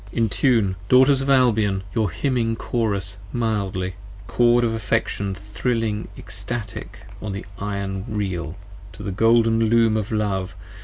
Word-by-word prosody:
Entune, 115 Hz, -2 st, +2 dB, 0.2 s
Daughters 130 Hz, +2 st, +6 dB
of 135 Hz, -, -2 dB
Albion, 110 Hz, -7 st, +3 dB
your 110 Hz, -4 st, +1 dB
hymning 115 Hz, -, 0 dB
Chorus 100 Hz, -5 st, -2 dB
mildly: 100 Hz, -6 st, -1 dB, 0.3 s
Cord 120 Hz, +2 st, +3 dB
of 115 Hz, -1 st, +1 dB
affection 105 Hz, -2 st, -1 dB, 0.2 s
thrilling 115 Hz, -2 st, -1 dB
extatic 100 Hz, +4 st, -6 dB, 0.2 s
on 105 Hz, -2 st, -4 dB
the 95 Hz, -, -6 dB
iron 100 Hz, -1 st, -3 dB
Reel: 95 Hz, -5 st, -3 dB, 0.4 s
To -, -, -9 dB
the 100 Hz, -, -3 dB
golden 115 Hz, +2 st, +4 dB
Loom 115 Hz, 0 st, +4 dB
of 110 Hz, 0 st, -2 dB
Love! 95 Hz, -4 st, -1 dB
110 Hz, 125 wpm, -23 LUFS, 100-115 Hz, 0.4 s, Daughters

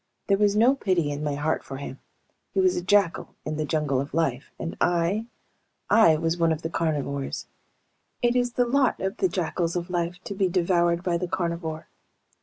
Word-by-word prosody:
There 195 Hz, -, +3 dB
was 205 Hz, -1 st, +3 dB
no 235 Hz, +5 st, +5 dB
pity 185 Hz, -, 0 dB
in 145 Hz, +1 st, -4 dB
my 145 Hz, -1 st, -1 dB
heart 150 Hz, +2 st, -1 dB
for 135 Hz, -, -7 dB
him. 135 Hz, -1 st, -7 dB, 0.6 s
He -, -, +3 dB
was 370 Hz, -1 st, +4 dB
a -, -, -1 dB
jackal 190 Hz, -1 st, +1 dB
in 155 Hz, 0 st, -3 dB
the 155 Hz, -, -1 dB
jungle 145 Hz, -4 st, 0 dB
of 140 Hz, +2 st, -6 dB
life, 140 Hz, -5 st, 0 dB
and 165 Hz, -, -5 dB, 0.2 s
I... 195 Hz, +7 st, 0 dB, 0.6 s
I 195 Hz, -9 st, +6 dB
was 165 Hz, +2 st, 0 dB
one 165 Hz, -1 st, +3 dB
of 160 Hz, 0 st, -2 dB
the 165 Hz, -, -3 dB
carnivores. 140 Hz, -4 st, -2 dB, 0.8 s
It 240 Hz, 0 st, +3 dB
is 245 Hz, -1 st, +1 dB
the 245 Hz, -, +2 dB
lot 260 Hz, +1 st, +2 dB
of 190 Hz, +1 st, -2 dB
the 375 Hz, -, +2 dB
jackals 170 Hz, -, -1 dB
of 175 Hz, 0 st, -3 dB
life 175 Hz, 0 st, -1 dB
to -, -, -5 dB
be 190 Hz, -1 st, +1 dB
devoured 175 Hz, -1 st, +2 dB
by 175 Hz, -2 st, 0 dB
the 180 Hz, -, -2 dB
carnivore. 170 Hz, -3 st, -3 dB
170 Hz, 200 wpm, -26 LUFS, 155-200 Hz, 0.8 s, I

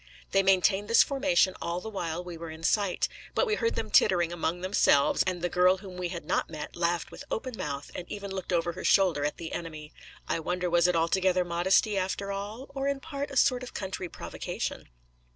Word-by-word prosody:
They 195 Hz, -, +4 dB
maintained 195 Hz, +1 st, +3 dB
this 230 Hz, -, +6 dB
formation 270 Hz, -8 st, +2 dB
all 170 Hz, +1 st, -2 dB
the 200 Hz, -, -8 dB
while 175 Hz, -5 st, -3 dB
we 175 Hz, -1 st, -7 dB
were 165 Hz, 0 st, -7 dB
in 160 Hz, +1 st, -10 dB
sight; 200 Hz, +1 st, +1 dB, 0.3 s
but -, -, +3 dB
we 430 Hz, -, 0 dB
heard 460 Hz, +2 st, 0 dB
them -, -, -3 dB
tittering 175 Hz, -2 st, +4 dB
among 175 Hz, +1 st, -2 dB
themselves, 185 Hz, -7 st, +3 dB
and 180 Hz, -2 st, -2 dB
the -, -, +2 dB
girl 180 Hz, +1 st, +4 dB
whom 190 Hz, -1 st, -10 dB
we 180 Hz, -1 st, -3 dB
had 170 Hz, -3 st, -6 dB
not -, -, 0 dB
met 155 Hz, -2 st, -7 dB
laughed 170 Hz, 0 st, -1 dB
with -, -, -9 dB
open 255 Hz, +1 st, -3 dB
mouth, 140 Hz, -6 st, -5 dB
and 180 Hz, -, -7 dB
even 200 Hz, -1 st, -5 dB
looked 190 Hz, -1 st, -5 dB
over 170 Hz, -1 st, +1 dB
her 185 Hz, +2 st, -8 dB
shoulder 180 Hz, -7 st, +3 dB
at 150 Hz, -, -2 dB
the 165 Hz, -1 st, -6 dB
enemy. 155 Hz, -2 st, -6 dB, 0.3 s
I -, -, 0 dB
wonder 180 Hz, +2 st, -2 dB
was 175 Hz, 0 st, +4 dB
it 180 Hz, -, +2 dB
altogether 180 Hz, +2 st, +2 dB
modesty 190 Hz, +4 st, +2 dB
after 195 Hz, +1 st, -2 dB
all? 205 Hz, +6 st, -5 dB
or 275 Hz, 0 st, -2 dB
in 280 Hz, -1 st, 0 dB
part 285 Hz, -1 st, -5 dB
a 275 Hz, -, -4 dB
sort 250 Hz, -1 st, +4 dB
of 255 Hz, -, -9 dB
country 190 Hz, -2 st, -4 dB
provocation? -, -, -5 dB
180 Hz, 215 wpm, -28 LUFS, 170-200 Hz, 0.3 s, this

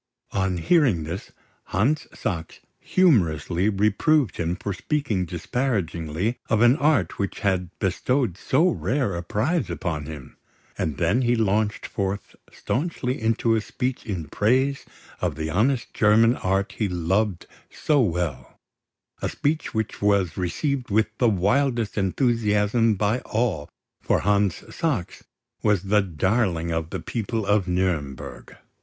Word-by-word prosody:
On 95 Hz, -2 st, 0 dB
hearing 115 Hz, -, +3 dB
this, 85 Hz, +5 st, -6 dB, 0.3 s
Hans 135 Hz, +11 st, 0 dB
Sachs 85 Hz, -7 st, -4 dB, 0.2 s
humorously 95 Hz, -, +2 dB
reproved 110 Hz, -, +2 dB
him 85 Hz, +1 st, -1 dB
for 100 Hz, +1 st, -4 dB
speaking 110 Hz, -, -1 dB
disparagingly 90 Hz, -, -2 dB
of 110 Hz, -1 st, +2 dB
an 120 Hz, +2 st, +6 dB
art 140 Hz, -, +1 dB
which 100 Hz, -1 st, -3 dB
had 95 Hz, -4 st, 0 dB
bestowed 105 Hz, +3 st, 0 dB
so 135 Hz, -, +2 dB
rare 135 Hz, -, 0 dB
a 85 Hz, -, -3 dB
prize 120 Hz, -, -1 dB
upon 75 Hz, -5 st, -3 dB
him; 75 Hz, -5 st, -9 dB, 0.4 s
and 75 Hz, -3 st, -2 dB
then 95 Hz, +9 st, +2 dB
he 120 Hz, -1 st, +2 dB
launched 105 Hz, -1 st, 0 dB
forth 100 Hz, 0 st, -3 dB, 0.2 s
staunchly 130 Hz, -4 st, -2 dB
into 115 Hz, +1 st, +2 dB
a 110 Hz, -, +2 dB
speech 125 Hz, +3 st, -3 dB
in 90 Hz, -8 st, -4 dB
praise 130 Hz, -, +1 dB, 0.3 s
of -, -, -1 dB
the 80 Hz, 0 st, -3 dB
honest 115 Hz, -, +1 dB
German 115 Hz, +3 st, +4 dB
art 95 Hz, +2 st, 0 dB
he 105 Hz, -3 st, +1 dB
loved 90 Hz, +3 st, 0 dB, 0.2 s
so 150 Hz, -3 st, +1 dB
well, 85 Hz, -, -2 dB, 0.6 s
a -, -, -1 dB
speech 150 Hz, +2 st, -1 dB
which 110 Hz, -1 st, -2 dB
was 100 Hz, -4 st, +2 dB
received 125 Hz, -, -2 dB
with 110 Hz, +1 st, +1 dB
the 120 Hz, -, +4 dB
wildest 115 Hz, +4 st, +1 dB
enthusiasm 110 Hz, +1 st, +2 dB
by 105 Hz, +5 st, +1 dB
all, 110 Hz, -13 st, -1 dB, 0.3 s
for -, -, +1 dB
Hans 100 Hz, -1 st, +1 dB
Sachs 125 Hz, -, -2 dB, 0.4 s
was 105 Hz, -4 st, +2 dB
the 105 Hz, +2 st, +3 dB
darling 95 Hz, -1 st, 0 dB
of 80 Hz, -1 st, -2 dB
the -, -, -4 dB
people 115 Hz, -1 st, -3 dB
of 100 Hz, -1 st, +2 dB
Nuremburg. 90 Hz, -7 st, -2 dB
105 Hz, 135 wpm, -24 LUFS, 90-120 Hz, 0.6 s, an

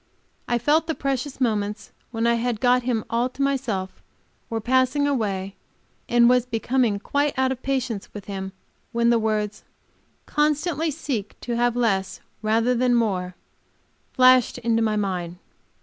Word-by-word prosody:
I 240 Hz, -, +1 dB
felt 300 Hz, +7 st, +2 dB
the 320 Hz, -, -1 dB
precious 270 Hz, 0 st, -3 dB
moments 210 Hz, -4 st, -1 dB, 0.2 s
when 230 Hz, -1 st, -2 dB
I 235 Hz, -, +4 dB
had 235 Hz, -1 st, -1 dB
got 250 Hz, +1 st, +3 dB
him 240 Hz, -3 st, -1 dB
all 235 Hz, +2 st, 0 dB
to 255 Hz, -, -8 dB
myself 235 Hz, -9 st, -2 dB, 0.5 s
were 225 Hz, -, -2 dB
passing 260 Hz, +4 st, +2 dB
away, 200 Hz, -8 st, -1 dB, 0.6 s
and 235 Hz, 0 st, +5 dB
was 250 Hz, 0 st, +3 dB
becoming 240 Hz, -2 st, +1 dB
quite 285 Hz, +7 st, -1 dB
out 260 Hz, 0 st, +2 dB
of 260 Hz, -1 st, -4 dB
patience 255 Hz, -6 st, -2 dB
with 205 Hz, -2 st, -9 dB
him 190 Hz, -1 st, -5 dB, 0.4 s
when 235 Hz, 0 st, +3 dB
the 235 Hz, -, +3 dB
words 215 Hz, -1 st, -2 dB, 0.6 s
"Constantly 300 Hz, +2 st, 0 dB
seek 270 Hz, -9 st, -4 dB
to 240 Hz, -, -3 dB
have 240 Hz, 0 st, +1 dB
less, 200 Hz, -6 st, 0 dB, 0.2 s
rather 225 Hz, +3 st, +2 dB
than 245 Hz, 0 st, +2 dB
more," 185 Hz, -6 st, 0 dB, 0.8 s
flashed 255 Hz, -1 st, +5 dB
into 230 Hz, -2 st, +1 dB
my 215 Hz, -1 st, +1 dB
mind. 180 Hz, -4 st, -2 dB
235 Hz, 150 wpm, -24 LUFS, 215-260 Hz, 0.8 s, and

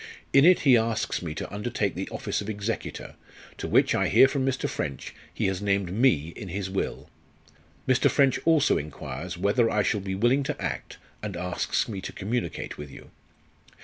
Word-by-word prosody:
In 140 Hz, +1 st, +7 dB
it 180 Hz, 0 st, +6 dB
he 135 Hz, -4 st, +6 dB
asks 115 Hz, -1 st, 0 dB
me 80 Hz, -3 st, -5 dB
to -, -, -6 dB
undertake 105 Hz, -1 st, -1 dB
the 95 Hz, +2 st, -5 dB
office -, -, -3 dB
of 105 Hz, -, -6 dB
executor, 105 Hz, +2 st, -4 dB, 0.5 s
to -, -, -3 dB
which, -, -, +3 dB
I -, -, +2 dB
hear 135 Hz, -, +7 dB
from 135 Hz, -1 st, -1 dB
Mr. 130 Hz, -1 st, 0 dB
French, 70 Hz, -3 st, -4 dB, 0.2 s
he -, -, -2 dB
has 95 Hz, 0 st, -1 dB
named 100 Hz, -3 st, 0 dB
me 95 Hz, -, +3 dB
in 105 Hz, -, -7 dB
his 95 Hz, +1 st, -4 dB
will. 95 Hz, -, -3 dB, 0.8 s
Mr. 130 Hz, -1 st, +4 dB
French 135 Hz, -3 st, +3 dB
also 160 Hz, -3 st, +4 dB
enquires 80 Hz, +4 st, -6 dB
whether 100 Hz, +5 st, +2 dB
I 105 Hz, -2 st, +1 dB
shall 105 Hz, -, 0 dB
be 95 Hz, 0 st, -3 dB
willing 120 Hz, +7 st, +3 dB
to 135 Hz, -, -3 dB
act, -, -, -4 dB, 0.2 s
and -, -, -5 dB
asks 90 Hz, 0 st, -1 dB
me 100 Hz, -4 st, -5 dB
to -, -, -6 dB
communicate 100 Hz, -8 st, -3 dB
with 75 Hz, -1 st, -7 dB
you. -, -, -13 dB
105 Hz, 185 wpm, -26 LUFS, 95-125 Hz, 0.8 s, In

